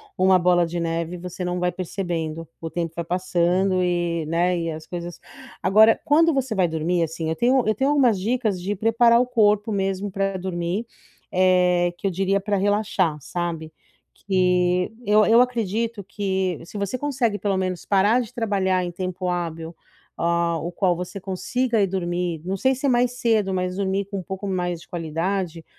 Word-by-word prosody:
uma 185 0 +4
bola 175 0 +3
de 170 +1 -4
neve 165 +1 -2
e - - -7
você 180 +1 -6
não 180 0 -2
vai 180 0 +1
percebendo, 170 -3 -4
o 165 - -4
tempo 165 0 -3
vai 170 - -3
passando 185 +1 +1
e, 175 -2 0
né, 175 +3 +1
e 165 0 -2
as 155 0 -8
coisas 175 0 -7 0.4
agora 220 +3 +5
quando 325 +3 +4
você 265 -5 -1
vai 185 -3 +2
dormir 165 +2 -1
assim, 165 0 -2
eu 160 - -1
tenho 250 +6 +3
eu 215 - +3
tenho 265 +6 0
algumas 255 -8 +3
dicas 220 -3 -1
de 200 +3 -2
preparar 230 +3 +4
o 250 - +3
corpo 215 -3 +2
mesmo 195 0 -1
pra 195 0 -1
dormir, 180 +3 -3 0.5
eh, 180 -1 +3
que - - -9
eu - - 0
diria 195 +2 +1
pra 205 0 0
relaxar 195 -5 +1
sabe, 165 0 -4 0.4
que 180 -1 +1
eu 210 +1 +5
eu 230 +1 +5
acredito 230 -2 -1
que 190 -3 -2
se 205 - -9
você 200 +5 -2
consegue 255 -6 -1
pelo 200 -2 0
menos 185 -2 -3
parar 205 +4 +3
de 230 - -8
trabalhar 195 -5 0
em 175 - -4
tempo 185 +1 -4
hábil, 165 -2 -4 0.4
ah, 170 0 +1
o 170 +3 -4
qual 180 0 +1
você 180 +3 -6
consiga 220 +5 -1
ir 195 - +3
dormir, 175 -3 -2
não 190 - -1
sei 260 +7 +2
se 265 +2 -4
é - - +3
mais 245 0 +2
cedo, 215 -5 +1
mas 180 0 -2
dormir 195 0 -1
com 200 +1 -6
um - - -7
pouco 190 +3 -6
mais 175 -2 -2
de - - -16
qualidade, 170 +1 -3
185 Hz, 190 wpm, -23 LUFS, 175-205 Hz, 0.5 s, agora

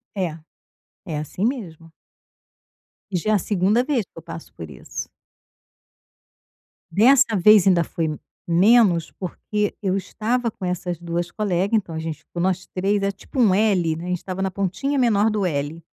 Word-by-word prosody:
É, 175 -5 -2 0.7
é 160 -5 -4
assim 165 +7 -3
mesmo. 170 - -4 1.2
E, - - -3
já, 215 +6 -1
é - - +4
a - - +5
2ª 205 +5 +1
vez 270 -7 0
que - - -29
eu - - -7
passo - - -10
por - - -9
isso. - - -7 1.8
Dessa 235 +4 +5
vez 200 +1 +6
ainda 175 -3 +4
foi 160 -3 -3 0.3
menos, 180 -1 +4
porque 205 +3 -3
eu 190 -1 +1
estava 230 +5 -1
com 205 - -12
essas 180 -1 -3
2 170 0 -3
colega, 200 0 0
então, 190 -6 -1
a 160 - -3
gente 160 -2 -5
ficou 175 - -6
nós 185 0 0
3, 195 +2 0
é 200 - +1
tipo 225 +6 -4
um 210 -6 +5
L, 185 -6 +2
né, 170 - -7
a - - -6
gente 180 0 0
estava 185 +2 -6
na 190 - 0
pontinha 200 +10 -2
menor 225 -4 +3
do 210 -3 -1
L. 150 +1 -3
190 Hz, 175 wpm, -22 LUFS, 170-215 Hz, 1.8 s, vez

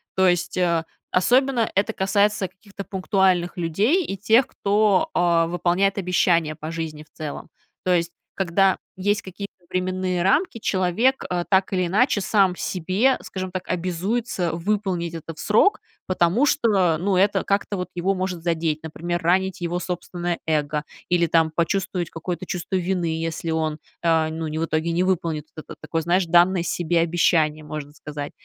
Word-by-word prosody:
То 190 0 +4
есть, 175 0 0
э, 170 -2 +2 0.3
особенно 245 +4 +3
это 210 +3 +1
касается 200 0 +1
каких-то 200 +1 -11
пунктуальных 190 -2 +1
людей 210 - +1
и 195 - -4
тех, 225 +6 +4
кто, 210 +9 +2
э, 170 -1 +3
выполняет 180 +3 +1
обещания 170 -4 +2
по 155 +2 -6
жизни 160 -2 -5
в - - -30
целом. 155 -2 -6 0.3
То 185 - +2
есть, 170 -1 +1 0.2
когда 195 +1 +2 0.2
есть 205 +2 0
какие-то 200 +2 -7 0.2
временные 185 -1 -1
рамки, 250 - +2
человек, 205 +8 +1
а, 175 -1 -1
так 190 +1 +1
или 185 -1 +1
иначе 215 +3 +2
сам 195 -2 +3
в - - -13
себе, 190 +9 +1
скажем 185 -1 -6
так, 185 -1 -5
обязуется 185 +2 -1
выполнить 180 -1 -1
это 165 0 -7
в 150 - -17
срок, 220 - +3 0.2
потому 185 +8 +2
что, 190 - +2
ну, 185 +3 0
это 195 0 +3
как-то 200 +1 0
вот 180 0 -4
его 180 +3 0
может 185 -3 -3
задеть. 160 -2 0
Например, 175 +2 -3
ранить 185 +3 +1
его 175 +1 -2
собственное 175 -1 -4
эго 150 -1 0 0.3
или, 175 -1 +3
там, 160 -1 +2
почувствовать 175 +1 -1
какое-то 175 +2 -5
чувство 180 +2 -4
вины, 175 -3 -1
если 165 0 -3
он, 155 -1 -1 0.2
э, 160 -1 +3
ну, 160 0 -4
в 160 +2 -2
итоге 160 +1 -1
не 175 +2 +1
выполнит 165 -5 -1
т 155 - -9 0.2
такое, 165 +1 -2
знаешь, 175 +3 +2
данное 175 +1 +4
себе 175 -1 0
обещание, 160 -2 +2
можно 150 -1 -6
сказать. 145 -1 -7
180 Hz, 160 wpm, -23 LUFS, 165-195 Hz, 0.3 s, То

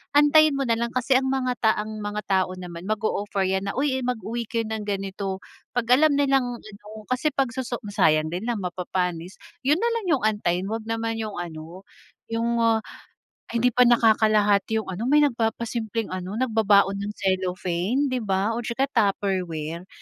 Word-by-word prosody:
antayin 295 0 +6
mo 275 - 0
nalang 235 -1 0
kasi 255 +1 +3
ang 265 - -2
mga 260 -1 0
ta 220 -1 +4
mga 210 -1 -5
tao 185 -1 +2
naman 180 0 -8
mag-o-offer 205 -2 -1
'yan 190 +1 -1
na, - - -4
"uy, 265 -1 0
mag-uwi 235 -1 -3
kayo 230 0 -1
ng 215 -1 -4
ganito," 195 -1 -3 0.3
Pag 245 0 +2
alam 295 +1 +5
nilang 270 -4 +1
ano, 210 -1 -14 0.2
kasi 255 +4 +1
pag 270 -4 -1
soso 255 -2 -4
sayang 155 -5 +2
din 185 +6 -4
lang 225 -5 -2
mapapanis, 180 0 -3 0.3
'yun 295 - +5
nalang 460 0 -1
'yung 250 - -5
antayin, 200 -4 +1
'wag 225 0 -4
naman 225 0 -2
'yung 215 -2 -4
ano, 170 +1 -7 0.5
'yung 230 +1 0
ah, 225 -1 +3 0.7
ay 235 0 -2
hindi 250 - +5
pa 250 +2 +5
nakakalahati 215 -2 +3
'yung 220 - -5
ano, 215 +7 -4
may 295 +2 +5
nagpapasimpleng 230 -2 -2
ano 185 +2 -4
nagbabaon 210 -5 +3
ng 205 +1 -4
cellophane 190 +6 -1
di 255 - +1
ba 195 0 0
o - - -2
tsaka 240 +3 -1
Tupperware, 180 -5 -1
220 Hz, 170 wpm, -24 LUFS, 190-245 Hz, 0.7 s, antayin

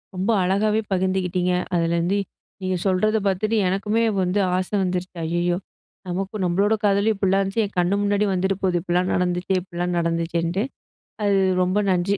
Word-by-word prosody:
ரொம்ப 195 +5 0
அழகாவே 210 +4 +1
பகிர்ந்துக்கிட்டீங்க. 185 -1 0 0.2
அதுலருந்து 170 +3 +1 0.4
நீங்க 185 0 -1
சொல்றத 215 +4 +2
பாத்துட்டு 215 +4 0
எனக்குமே 210 +4 0 0.2
வந்து 185 +3 +1 0.2
ஆச 185 0 -1
வந்துருச்சு. 180 0 -3
ஐயய்யோ! 175 +1 0 0.5
நமக்கு 195 +3 -3
நம்மளோட 200 +5 +2
காதலும் 205 +2 +3
இப்புட்லாம் 195 0 +2
இருந்துச்சு, 200 +3 0
என் 200 - -10
கண்ணு 180 +3 +2
முன்னாடி 205 +1 +2
வந்துட்டு 190 +1 0
போகுது. 180 -2 +2
இப்புட்லாம் 180 +1 0
நடந்துச்சே! 180 +1 0
இப்புட்லாம் 175 -1 -3
நடந்துச்சேன்ட்டு. 170 +3 -1 0.6
அது 200 -1 +3 0.2
ரொம்ப 185 +3 +1
நன்றி, 185 +2 +1
185 Hz, 145 wpm, -23 LUFS, 180-200 Hz, 0.6 s, காதலும்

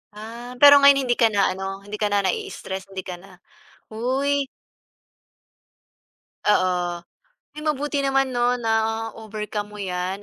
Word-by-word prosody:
Ah. 235 +3 -9
Pero, 285 0 +10
ngayon 280 -1 +6
hindi 245 -2 +1
ka 230 - +6
na 205 -3 +2
ano, 195 +1 -6
hindi 205 +1 -7
ka 210 - +1
na 205 -1 +1
naii-stress, 190 +1 -4
hindi 190 -1 -6
ka 180 - -6
na 195 +2 -16 0.6
uy. 270 +5 0 2.0
Oo. 180 -3 +1 0.5
Uy, 300 - -8
mabuti 295 -1 -1
naman, 270 -1 +1
'no, 245 +1 +1
na-overcome 220 -2 -2
mo 210 - -11
'yan 185 0 -3
220 Hz, 135 wpm, -23 LUFS, 195-255 Hz, 2.0 s, Pero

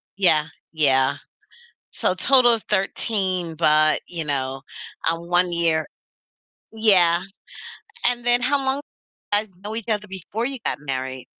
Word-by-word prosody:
Yeah, 160 -6 +3 0.2
yeah. 140 -3 +2 0.8
So - - 0
total 255 -3 +4
of 225 - -4
13, 190 -3 -1
but, 155 -1 +3
you 170 -3 -5
know, 135 -2 -2 0.5
um, 165 +1 -2
1 175 0 +3
year 165 -2 +1 0.9
Yeah. 185 -6 +4 0.8
And 245 -1 +1
then 245 0 +4
how 285 +3 +2
long 265 +2 -1 0.5
guys 210 +1 +1 0.2
know 215 +1 -5
each 230 0 -6
other 210 -1 -1
before 195 +4 -5
you 270 0 -3
got - - -1
married? 130 -2 -5
180 Hz, 130 wpm, -22 LUFS, 155-220 Hz, 0.9 s, total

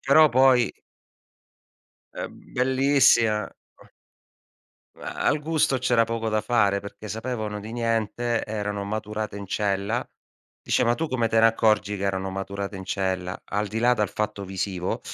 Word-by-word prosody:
però 150 +3 +6
poi 130 -1 +4 1.4
ehm, - - -8
bellissima, 130 -4 +3 1.5
ma - - -7
al 150 - +1
gusto 150 -4 +1
c'era 120 -2 +3
poco 115 0 -3
da 110 0 +1
fare, 105 -3 +2
perché 105 +1 -9
sapevano 110 -1 -4
di 110 +2 -8
niente. 115 0 -1
Erano 105 -1 -3
maturate 105 0 -4
in 100 -1 -7
cella. 100 +4 -1 0.6
Dice: - - +1
"Ma 120 - +3
tu 160 +6 -3
come 120 -3 0
te 115 - +2
ne 115 - +7
accorgi 105 -2 +2
che 100 - -4
erano 95 -1 -1
maturate 100 +1 -5
in 95 - -7
cella?" 95 -1 -2
Al 105 +2 -2
di 110 - -3
là 120 +2 +4
dal 105 -4 0
fatto 105 -2 -3
visivo, 95 -1 -3
110 Hz, 145 wpm, -25 LUFS, 100-120 Hz, 1.5 s, ne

